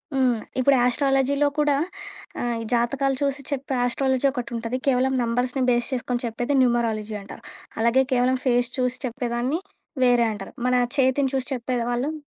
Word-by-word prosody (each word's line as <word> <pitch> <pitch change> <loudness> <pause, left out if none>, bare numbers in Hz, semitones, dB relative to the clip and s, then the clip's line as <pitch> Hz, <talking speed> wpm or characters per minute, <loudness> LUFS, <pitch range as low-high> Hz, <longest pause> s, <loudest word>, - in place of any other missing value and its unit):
హ్మ్. 250 -4 +2 0.2
ఇప్పుడు 275 +2 +4
ఆస్ట్రాలజీలో 270 +2 +2
కూడా 295 -1 +3 0.7
ఆహ్, 240 -1 -1
ఈ - - -4
జాతకాలు 265 +3 +1
చూసి 280 0 0
చెప్పే 275 -1 -3
ఆస్ట్రాలజీ 260 +2 0
ఒకటి 245 -3 -5
ఉంటది. 230 +2 -3
కేవలం 265 0 +2
నంబర్స్‌ని 245 +3 0
బేస్ 240 -1 +2
చేసుకొని 245 -1 -2
చెప్పేది 240 +4 -2
న్యూమరాలజీ 225 -3 0
అంటారు. 195 - -11 0.4
అలాగే 235 +3 +4
కేవలం 255 +1 +2
ఫేస్ 245 -1 +2
చూసి 250 0 0
చెప్పేదాన్ని, 245 +5 -2 0.4
వేరే 245 -1 +4
అంటరు. 200 -2 -7
మన 250 - +3 0.2
చేతిని 265 0 +3
చూసి 260 -1 -1
చెప్పేది 245 -1 -2
వాల్లమ్ 270 +6 -1
250 Hz, 150 wpm, -24 LUFS, 240-270 Hz, 0.7 s, ఇప్పుడు